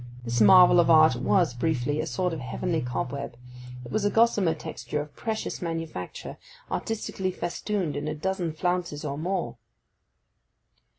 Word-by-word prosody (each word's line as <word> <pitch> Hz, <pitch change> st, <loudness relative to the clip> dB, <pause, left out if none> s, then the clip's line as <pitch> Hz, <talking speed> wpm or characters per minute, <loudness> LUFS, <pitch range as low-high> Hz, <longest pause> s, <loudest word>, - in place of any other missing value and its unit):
This 120 Hz, -1 st, -1 dB
marvel 180 Hz, -, +8 dB
of 170 Hz, -, +4 dB
art 155 Hz, -4 st, +6 dB
was, 165 Hz, +4 st, +2 dB
briefly, 145 Hz, +2 st, -1 dB
a 160 Hz, -, -4 dB
sort 170 Hz, +6 st, -1 dB
of 160 Hz, -, -4 dB
heavenly 160 Hz, +6 st, -2 dB
cobweb. 125 Hz, +1 st, -4 dB, 0.5 s
It 120 Hz, -, -10 dB
was 215 Hz, -, 0 dB
a 205 Hz, -, +3 dB
gossamer 205 Hz, -6 st, +3 dB
texture 150 Hz, -1 st, -5 dB
of 145 Hz, 0 st, -7 dB
precious 220 Hz, -2 st, -4 dB
manufacture, 165 Hz, -, -5 dB, 0.3 s
artistically 210 Hz, -4 st, -2 dB
festooned 180 Hz, -1 st, -3 dB
in 145 Hz, +1 st, -3 dB
a 155 Hz, -, -2 dB
dozen 180 Hz, +1 st, -2 dB
flounces 175 Hz, -2 st, -2 dB
or 140 Hz, -1 st, -3 dB
more. 180 Hz, +2 st, -2 dB
165 Hz, 145 wpm, -26 LUFS, 145-185 Hz, 0.5 s, marvel